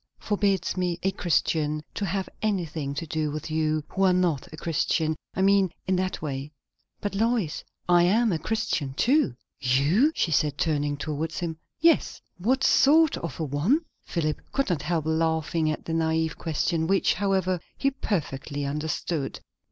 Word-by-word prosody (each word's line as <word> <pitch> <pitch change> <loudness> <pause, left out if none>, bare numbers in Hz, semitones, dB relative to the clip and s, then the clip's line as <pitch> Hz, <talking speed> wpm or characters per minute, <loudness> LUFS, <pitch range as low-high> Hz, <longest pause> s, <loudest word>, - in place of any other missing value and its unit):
"Forbids 200 -4 0
me, 180 -2 -1
a 195 - +2
Christian, 155 -4 0
to 205 - -2
have 190 0 -2
anything 165 -9 -2
to 155 - -3
do 155 -1 -1
with 155 +2 -5
you, 155 -1 +1
who 195 - -3
are 185 -1 +5
not 175 -7 0
a 155 - -9
Christian. 160 0 0 0.2
I 190 - +1
mean, 195 -2 +4
in 185 - +1
that 185 -3 -2
way." 140 0 -4 0.5
"But, 205 - -2
Lois 220 -6 0 0.2
I 175 -1 +5
am 220 +5 +3
a 165 - 0
Christian 155 -9 -2
too." 255 - +3 0.2
"You?" 145 - +3
she 165 - 0
said, 145 -1 +2
turning 145 -2 0
towards 155 +2 -3
him. 165 -2 -3 0.2
"Yes." 330 0 +3 0.2
"What 260 +8 +1
sort 310 +3 +5
of 170 - -6
a - - 0
one?" 165 - +1 0.2
Philip 155 -3 -2
could 275 -8 0
not 160 -5 0
help 160 0 -1
laughing 160 0 +1
at 155 - -3
the 165 - -3
naïve 160 0 +1
question, 160 0 -1
which, 195 +1 +3
however, 190 -2 0 0.2
he 275 - +1
perfectly 145 - -3
understood. 150 0 -2
165 Hz, 165 wpm, -26 LUFS, 155-195 Hz, 0.5 s, are